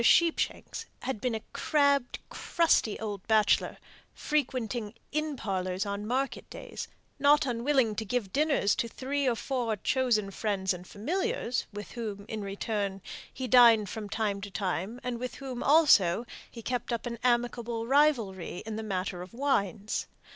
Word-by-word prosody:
Sheepshanks 335 +7 +2
had 265 -6 -3
been 250 -3 0
a 220 - -5
crabbed, 280 -4 +2
crusty 330 -10 +2
old 205 -3 -4
bachelor, 220 -2 +3 0.4
frequenting 245 -6 -1 0.2
inn 305 0 -1
parlours 185 -2 -2
on 200 +1 -3
market 265 +3 -2
days, - - -7 0.3
not 290 +1 +5
unwilling 245 -1 +2
to 220 - -1
give 215 -3 -2
dinners 285 -8 +3
to 235 - 0
three 275 +4 -2
or 240 - +1
four 240 -3 -1
chosen 215 -2 +1
friends 195 -2 0
and 180 0 -9
familiars, 325 - -2
with 205 0 -8
whom, 210 -4 -5
in 220 -1 -4
return, 200 -1 -3 0.3
he 260 -1 -4
dined 230 -5 +7
from 210 0 -6
time 205 -2 -1
to 200 - -6
time, 195 +3 -2
and 245 -2 -3
with 250 0 -4
whom, 260 -3 -6
also, 245 - +5 0.2
he 230 - -10
kept 245 0 -2
up 235 0 -2
an 235 -1 -4
amicable 240 -1 0
rivalry 230 - +2
in 220 -1 -4
the - - -3
matter 185 -3 -3
of 185 +5 -10
wines. 215 -6 0
230 Hz, 155 wpm, -29 LUFS, 205-260 Hz, 0.4 s, dined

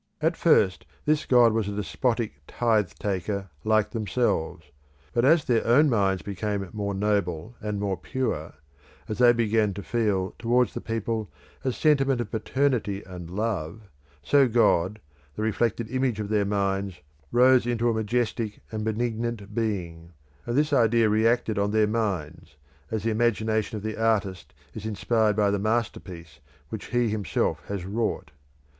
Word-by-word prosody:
At 160 +2 +1
first 100 - +3 0.2
this 150 0 +1
god 120 -3 +5
was 110 -2 0
a 100 - -4
despotic 110 - -2
tithe 110 -6 +1
taker 100 -1 -3
like 110 -1 +2
themselves; 105 - -1 0.4
but 120 - +2
as 150 +2 +4
their 120 -2 +2
own 140 +5 +4
minds 95 -4 +1
became 100 0 -3
more 100 -2 -3
noble, 100 0 -1
and 105 -1 -3
more 100 -2 -1
pure; 85 -6 -3 0.5
as 110 - -4
they 120 -1 +7
began 110 -3 +1
to 100 - -6
feel 100 -5 0
towards 120 +1 +2
the - - -5
people 115 -1 -3 0.3
a 130 - +1
sentiment 135 -2 +2
of 120 - -4
paternity 115 -4 0
and 90 -2 -9
love, 100 -2 -3 0.4
so 135 - +4
God, 110 -4 +2 0.4
the 110 - -3
reflected 110 +1 0
image 130 -4 0
of 105 -1 -3
their 105 -2 +2
minds, 100 -2 -1 0.3
rose 125 0 +5
into 120 -1 0
a 115 - +2
majestic 110 -1 -1
and 110 -1 -3
benignant 110 -1 -2
being, 85 -7 -3 0.3
and 120 - -1
this 150 0 +2
idea 115 -3 +4
reacted 110 0 +2
on 100 0 +1
their 110 0 +3
minds, 100 -10 -3 0.3
as 110 -2 -3
the 115 - +1
imagination 110 -1 0
of 105 - -8
the 110 0 -4
artist 100 -5 0 0.2
is 110 - -7
inspired 110 0 +1
by 105 -1 +2
the 100 - 0
masterpiece 95 -8 -3 0.3
which 110 - -6
he 120 -2 +1
himself 105 -2 -1
has 100 -3 -4
wrought. 105 -6 -2
110 Hz, 155 wpm, -26 LUFS, 100-120 Hz, 0.5 s, they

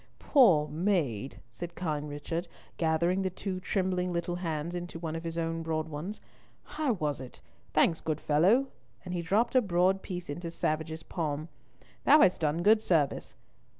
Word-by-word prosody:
"Poor 180 - +5
maid," 155 - -1
said 170 +8 -7
kind 150 -4 -3
Richard, 165 +4 -4 0.3
gathering 170 +3 +1
the 190 - 0
two 185 +1 -4
trembling 185 -1 -1
little 175 0 -2
hands 165 -1 -3
into 175 -1 -5
one 165 -1 -4
of 165 - -5
his 165 0 -4
own 165 0 -1
broad 160 -1 -2
ones. 160 +8 -5 0.4
"How 300 -5 -1
was 150 -8 -2
it? 130 - -10 0.3
Thanks, 165 - +3
good 155 -1 -2
fellow," 195 - +3 0.4
and 180 - -5
he 175 - -1
dropped 205 +8 +1
a 255 - +5
broad 190 -1 +2
piece 180 -2 -6
into 170 +4 -5
Savage's 160 -1 -2
palm; 155 -2 -3 0.5
"thou 300 +2 +7
hast 180 - +4
done 155 +2 0
good 215 +2 +5
service. 160 -9 0
170 Hz, 165 wpm, -30 LUFS, 155-185 Hz, 0.5 s, thou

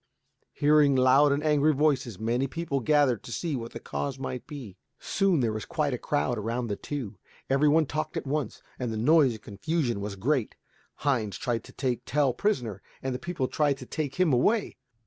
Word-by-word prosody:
Hearing 145 -1 +4
loud 130 +3 +5
and 140 +1 0
angry 150 0 +3
voices, 135 -7 +1
many 120 +5 0
people 150 -1 -2
gathered 135 -3 +3
to - - -10
see 150 +7 -2
what 115 -2 -5
the - - -6
cause 140 -2 -4
might 130 -1 -5
be. 135 - -8 0.2
Soon 195 -7 +1
there 115 -3 +1
was 110 - -4
quite 155 -5 -1
a 125 - -3
crowd 130 -5 0
around 115 +2 -2
the 100 - -1
two. 115 -6 -6 0.3
Every 135 +2 +4
one 155 +1 +4
talked 155 +2 -3
at - - -3
once, 140 -4 -3 0.2
and 125 -3 -2
the 110 - -3
noise 140 +2 +4
and 110 -1 -11
confusion 120 0 -2
were 100 0 -4
great. 125 +4 0 0.5
Heinz 115 -8 +1
tried 115 -2 -2
to - - -12
take 125 -3 -2
Tell 140 -2 +2
prisoner, 120 - -1 0.2
and 130 -1 -1
the 125 - -4
people 170 -6 -2
tried 145 -2 +1
to - - -9
take 145 -4 -3
him 180 -6 +3
away. 205 - +2
135 Hz, 200 wpm, -27 LUFS, 120-150 Hz, 0.5 s, loud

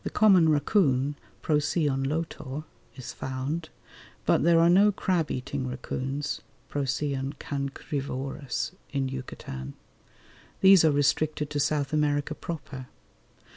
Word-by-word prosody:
The - - -2
common 190 -6 +5
racoon 145 -3 +2 0.3
(Procyon 150 -2 +1
lotor) 150 -2 -4 0.3
is 130 - -7
found, 140 +5 -4 0.6
but - - +3
there 170 +1 +5
are 165 - +6
no 195 +4 +6
crab 180 -5 0
eating 130 +1 -3
racoons 135 +3 -3 0.3
(Procyon 140 0 -1
cancrivorous) 140 0 -4 0.2
in 135 -2 -1
Yucatan: 70 - -7 0.9
these 190 -2 +8
are 160 - +6
restricted 150 +1 +1
to 145 - -1
South 145 0 0
America 150 0 +1
proper. 145 -5 -7
145 Hz, 110 wpm, -27 LUFS, 135-155 Hz, 0.9 s, these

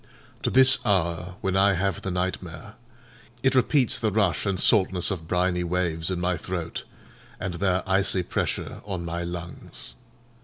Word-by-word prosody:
To - - 0
this 130 0 +6
hour, 90 -3 0
when 95 -1 -1
I 100 +1 +4
have 95 0 -1
the - - -4
nightmare, 90 -2 -4 0.7
it 135 0 +3
repeats 130 0 +3
the 110 - +1
rush 100 -3 +1
and 95 -2 0
saltness 95 -3 +4
of 80 -4 -5
briny 90 0 +1
waves 85 -2 -1
in 90 -2 -2
my 90 0 0
throat, 85 0 -5 0.5
and 90 - -3
their 95 +1 0
icy 95 -1 +2
pressure - - -3
on 95 -4 -5
my 85 +1 -3
lungs. 85 0 -7
90 Hz, 155 wpm, -25 LUFS, 85-100 Hz, 0.7 s, this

